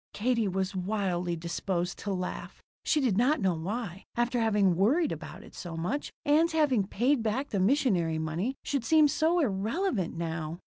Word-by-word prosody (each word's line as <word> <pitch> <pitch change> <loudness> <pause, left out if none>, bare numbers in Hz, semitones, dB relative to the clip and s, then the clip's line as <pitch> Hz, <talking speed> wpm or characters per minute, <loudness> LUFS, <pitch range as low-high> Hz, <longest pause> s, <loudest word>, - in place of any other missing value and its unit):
Katie 230 0 +1
was 190 +1 -2
wildly 180 -3 -1
disposed 175 +2 -3
to 200 - -3
laugh. 185 -1 -5 0.2
She 305 - +2
did 225 -7 +2
not 275 +6 +3
know 190 -3 +2
why, 190 +3 -5
after 240 +1 +1
having 205 -5 +3
worried 265 - +2
about - - -7
it - - -15
so 170 -2 -7
much, 180 - -2
Ann's 320 +3 +3
having 270 -11 +2
paid 245 +6 +1
back 230 +6 -1
the 200 - -1
missionary 190 - +2
money 165 +11 -2
should 280 -4 -1
seem 310 +4 +5
so 320 +4 +1
irrelevant 215 - -1
now. 165 -1 -3
205 Hz, 170 wpm, -29 LUFS, 180-265 Hz, 0.2 s, seem